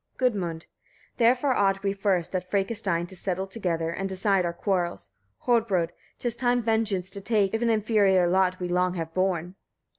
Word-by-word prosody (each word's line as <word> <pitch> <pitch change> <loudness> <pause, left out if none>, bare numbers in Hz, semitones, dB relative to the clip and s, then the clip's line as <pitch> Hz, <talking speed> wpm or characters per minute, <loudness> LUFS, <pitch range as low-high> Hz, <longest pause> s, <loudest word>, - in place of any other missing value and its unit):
Gudmund. 190 -10 0
19. - - -37 0.5
Therefore 250 +3 +3
ought 195 -3 +1
we 195 -1 +1
first, 195 -3 0
at 180 0 -3
Frekastein, 195 -4 0
to 190 - -10
settle 185 +1 -2
together, 175 -5 -2
and 195 +3 -3
decide 190 0 +1
our 170 - 0
quarrels! 175 -1 -2 0.3
Hodbrodd! 220 -8 +2 0.3
'tis 240 -2 -2
time 245 -1 +1
vengeance 210 -5 0
to 200 - -8
take, 205 -2 +1
if 225 - -1
an 235 - +2
inferior 210 -4 +3
lot 185 0 +2
we 180 - -2
long 180 +1 +1
have 165 -2 -5
borne. 185 -1 -1
195 Hz, 175 wpm, -26 LUFS, 180-220 Hz, 0.5 s, Therefore